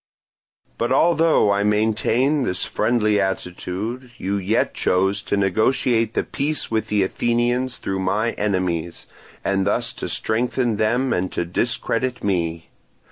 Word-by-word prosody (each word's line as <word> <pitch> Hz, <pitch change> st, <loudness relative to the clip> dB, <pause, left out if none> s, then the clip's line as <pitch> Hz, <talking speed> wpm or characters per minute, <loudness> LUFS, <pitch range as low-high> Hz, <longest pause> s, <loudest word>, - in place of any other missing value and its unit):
But 120 Hz, +1 st, 0 dB
although 160 Hz, -6 st, +4 dB
I 100 Hz, 0 st, +2 dB
maintained 110 Hz, +7 st, +2 dB
this 90 Hz, -7 st, -2 dB
friendly 110 Hz, -2 st, +1 dB
attitude, 95 Hz, +6 st, -4 dB
you 100 Hz, +2 st, -2 dB
yet 100 Hz, +3 st, 0 dB
chose 95 Hz, +2 st, +1 dB
to 100 Hz, -, -1 dB
negotiate 110 Hz, +3 st, +1 dB
the -, -, +1 dB
peace 150 Hz, -1 st, -2 dB
with 110 Hz, -1 st, 0 dB
the 105 Hz, -2 st, +2 dB
Athenians 120 Hz, +5 st, 0 dB
through 95 Hz, 0 st, -3 dB
my 105 Hz, +5 st, 0 dB
enemies, 90 Hz, -5 st, -2 dB, 0.4 s
and 100 Hz, 0 st, +1 dB
thus 120 Hz, +3 st, +1 dB
to -, -, -5 dB
strengthen 120 Hz, 0 st, 0 dB
them 120 Hz, +5 st, +1 dB
and 90 Hz, +1 st, -1 dB
to 85 Hz, -, -1 dB
discredit 120 Hz, +6 st, -1 dB
me. 85 Hz, -4 st, -1 dB
110 Hz, 135 wpm, -22 LUFS, 95-120 Hz, 0.4 s, although